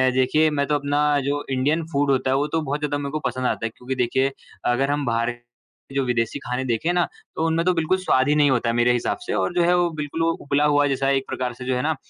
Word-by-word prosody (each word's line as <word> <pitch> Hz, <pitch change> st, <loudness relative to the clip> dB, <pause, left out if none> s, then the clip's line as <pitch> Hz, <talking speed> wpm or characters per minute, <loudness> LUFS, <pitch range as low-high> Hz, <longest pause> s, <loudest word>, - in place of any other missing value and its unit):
देखिए 155 Hz, +5 st, +3 dB
मैं 140 Hz, -2 st, 0 dB
तो 150 Hz, -, +1 dB
अपना 145 Hz, 0 st, +1 dB
जो 145 Hz, +1 st, -1 dB
इंडियन 145 Hz, +6 st, +1 dB
फूड 140 Hz, -1 st, +1 dB
होता 130 Hz, -1 st, +1 dB
है -, -, +3 dB
वो 145 Hz, -, 0 dB
तो 160 Hz, +2 st, -1 dB
बहुत 145 Hz, 0 st, -2 dB
ज़्यादा 145 Hz, -1 st, -1 dB
मेरे 140 Hz, -1 st, -4 dB
को 155 Hz, -, -2 dB
पसंद 130 Hz, 0 st, -3 dB
आता 115 Hz, -, -2 dB
है, -, -, -1 dB
क्योंकि 130 Hz, +1 st, -5 dB
देखिए 130 Hz, +2 st, +1 dB, 0.3 s
अगर 135 Hz, +3 st, +1 dB
हम 145 Hz, -1 st, -1 dB
बाहर 115 Hz, +1 st, 0 dB, 0.6 s
जो 135 Hz, -1 st, +1 dB
विदेशी 115 Hz, -2 st, -1 dB
खाने 125 Hz, +1 st, -3 dB
देखें 120 Hz, +8 st, 0 dB
ना, 175 Hz, -, +2 dB, 0.3 s
तो 160 Hz, -, 0 dB
उनमें 165 Hz, +1 st, 0 dB
तो 185 Hz, -, +3 dB
बिल्कुल 165 Hz, +2 st, +1 dB
स्वाद 140 Hz, -8 st, +2 dB
ही 150 Hz, -, +3 dB
नहीं 145 Hz, -1 st, +4 dB
होता 120 Hz, -2 st, +1 dB
है, 115 Hz, -, 0 dB
मेरे 120 Hz, +1 st, +3 dB
हिसाब 120 Hz, -, -1 dB
से -, -, -1 dB
और 175 Hz, -, 0 dB
जो 175 Hz, -, +3 dB
है 175 Hz, +1 st, +4 dB
वो 175 Hz, -1 st, +2 dB
बिल्कुल 155 Hz, +1 st, -3 dB
उबला 150 Hz, -3 st, +1 dB
हुआ 145 Hz, -1 st, +3 dB
जैसा 135 Hz, 0 st, 0 dB
एक 135 Hz, -1 st, +2 dB
प्रकार 125 Hz, -2 st, -3 dB
से 125 Hz, +1 st, -9 dB
जो 130 Hz, -, 0 dB
है 125 Hz, -, 0 dB
ना 160 Hz, +1 st, +1 dB
140 Hz, 270 wpm, -23 LUFS, 130-150 Hz, 0.6 s, नहीं